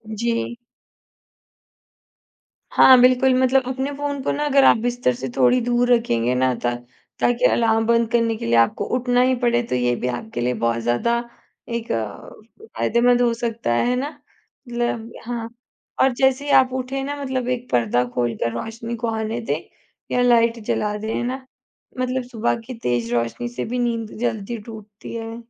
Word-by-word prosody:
जी। 235 Hz, +1 st, -2 dB, 2.2 s
हाँ, 260 Hz, -1 st, +8 dB
बिल्कुल, 255 Hz, +1 st, +5 dB
मतलब 260 Hz, +1 st, +3 dB
अपने 265 Hz, +2 st, -2 dB
फ़ोन 285 Hz, -1 st, -3 dB
को -, -, 0 dB
ना 295 Hz, +1 st, -1 dB
अगर 275 Hz, -1 st, +4 dB
आप -, -, +6 dB
बिस्तर 240 Hz, -, 0 dB
से 130 Hz, +2 st, -5 dB
थोड़ी 130 Hz, -, +4 dB
दूर 245 Hz, +1 st, +2 dB
रखेंगे 125 Hz, -, +1 dB
ना 130 Hz, 0 st, +2 dB
ता 120 Hz, 0 st, +1 dB, 0.5 s
ताकि 245 Hz, +1 st, +2 dB
अलार्म 225 Hz, -1 st, +2 dB
बंद 230 Hz, -1 st, +3 dB
करने 230 Hz, -1 st, +2 dB
के -, -, -6 dB
लिए 115 Hz, -, +2 dB
आपको 115 Hz, 0 st, +2 dB
उठना 245 Hz, 0 st, +2 dB
ही 255 Hz, 0 st, +3 dB
पड़े, 240 Hz, -1 st, +1 dB
तो 230 Hz, -, -3 dB
ये 125 Hz, -1 st, +1 dB
भी 125 Hz, -, -3 dB
आपके 125 Hz, -, -4 dB
लिए 125 Hz, +1 st, 0 dB
बहुत 115 Hz, 0 st, +1 dB
ज़्यादा 120 Hz, -, +1 dB, 0.6 s
एक 235 Hz, 0 st, -4 dB
अ, 110 Hz, -3 st, -4 dB, 0.5 s
फायदेमंद 245 Hz, +1 st, +3 dB
हो 235 Hz, -1 st, +3 dB
सकता 230 Hz, -, -2 dB
है, 120 Hz, -, +1 dB
है 250 Hz, -, +1 dB
ना? 275 Hz, +4 st, -2 dB, 0.6 s
मतलब 235 Hz, -1 st, -3 dB
हाँ। 230 Hz, -1 st, -4 dB, 0.5 s
और 265 Hz, -1 st, +4 dB
जैसे 265 Hz, +3 st, +1 dB
ही 290 Hz, -, -1 dB
आप 260 Hz, -1 st, +5 dB
उठे 260 Hz, +1 st, -3 dB
ना 285 Hz, +1 st, -3 dB
मतलब 260 Hz, -2 st, -2 dB
1 250 Hz, 0 st, -3 dB
पर्दा 120 Hz, 0 st, +2 dB
खोलकर 120 Hz, -1 st, -1 dB
रोशनी 230 Hz, +1 st, -6 dB
को 235 Hz, +1 st, -3 dB
आने 220 Hz, +1 st, -2 dB
दें, 155 Hz, -9 st, -2 dB, 0.5 s
या 250 Hz, -, +2 dB
लाइट 235 Hz, -1 st, +3 dB
जला 210 Hz, 0 st, -1 dB
दें, 220 Hz, +1 st, -4 dB
है -, -, -1 dB
ना? 260 Hz, +2 st, -4 dB, 0.5 s
मतलब 255 Hz, 0 st, -1 dB
सुबह 230 Hz, -1 st, 0 dB
की 255 Hz, -, -7 dB
तेज़ 120 Hz, -1 st, -1 dB
रोशनी 120 Hz, -, -1 dB
से 240 Hz, -, -5 dB
भी 250 Hz, +2 st, -3 dB
नींद 230 Hz, -2 st, -2 dB
जल्दी 230 Hz, -1 st, -2 dB
टूटती 215 Hz, -2 st, -10 dB
है। 225 Hz, 0 st, -5 dB
235 Hz, 175 wpm, -22 LUFS, 210-250 Hz, 2.2 s, हाँ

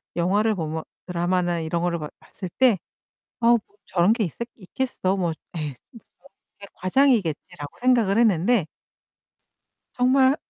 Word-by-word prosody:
영화를 205 Hz, +6 st, +2 dB
보면 160 Hz, -2 st, -3 dB, 0.2 s
드라마나 175 Hz, 0 st, 0 dB
이런 165 Hz, +1 st, -2 dB
거를 175 Hz, -1 st, 0 dB
봐 150 Hz, -, -5 dB
봤을 185 Hz, -3 st, -9 dB
때 250 Hz, -6 st, +5 dB, 0.6 s
'아 230 Hz, -, +2 dB
뭐 235 Hz, 0 st, +6 dB, 0.3 s
저런 185 Hz, +4 st, +3 dB
게 230 Hz, -, 0 dB
있었 170 Hz, -, -5 dB, 0.2 s
있겠어? 195 Hz, -2 st, -2 dB
뭐 175 Hz, -3 st, 0 dB, 0.2 s
에이 155 Hz, -3 st, -2 dB, 0.2 s
음 230 Hz, -, -12 dB, 0.6 s
저렇게 200 Hz, -, -10 dB
과장이겠지.'라고 185 Hz, -, 0 dB
생각을 235 Hz, -5 st, +3 dB
했는데 215 Hz, -2 st, +3 dB, 1.3 s
정말 260 Hz, +2 st, +4 dB
190 Hz, 280 characters per minute, -24 LUFS, 170-235 Hz, 1.3 s, 뭐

